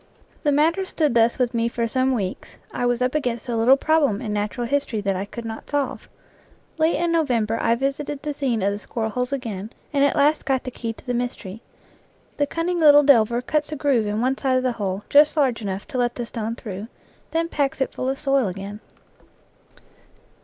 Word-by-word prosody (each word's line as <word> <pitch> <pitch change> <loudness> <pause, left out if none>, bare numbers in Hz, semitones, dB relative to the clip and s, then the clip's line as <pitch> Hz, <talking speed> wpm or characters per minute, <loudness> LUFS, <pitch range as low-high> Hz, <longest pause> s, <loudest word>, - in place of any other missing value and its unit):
The 295 - +2
matter 320 +6 +2
stood 310 -7 0
thus 230 0 +3
with 250 -1 0
me 230 0 +1
for 235 0 -1
some 260 +3 +1
weeks; 195 -5 -4 0.2
I 245 - 0
was 245 0 +1
up 250 - 0
against 250 -5 -2
a 240 - -1
little 240 +4 +5
problem 285 -8 +2
in 220 -4 -4
natural 210 +4 -2
history 275 -3 -1
that 195 -1 0
I 190 +2 -3
could 230 +3 -8
not 220 0 -7
solve. 285 -2 -2 0.7
Late 320 +1 +3
in 340 +3 0
November 235 -9 +1
I 230 0 +3
visited 275 +2 -3
the 300 -1 -2
scene 255 -7 -1
of 200 - +2
the 205 - -5
squirrel 220 +1 -4
holes 250 +3 -2
again, 220 -7 -4 0.2
and 280 -1 +3
at 285 - +3
last 300 +2 +3
got 265 -2 0
the 255 - -5
key 230 -1 -4
to 225 - -14
the 245 - -2
mystery: 235 -4 -4 0.8
the 290 - +1
cunning 340 +3 -1
little 295 -2 +7
delver 240 -3 +4
cuts 300 +3 -1
a - - -2
groove 270 -7 +1
in 210 +2 -1
one 260 +2 +1
side 265 -1 +1
of 255 - 0
the 255 - +1
hole 200 -3 -3
just 300 +2 +5
large 260 -6 +2
enough 195 -1 -4
to 255 - -3
let 240 0 0
the 240 - -4
stone 230 -1 -4
through, 210 -2 -7 0.4
then 330 +1 0
packs 285 -4 -1
it 265 - 0
full 255 - -2
of 270 - -2
soil 275 -5 +2
again. 195 +3 -6
250 Hz, 215 wpm, -23 LUFS, 225-285 Hz, 0.8 s, little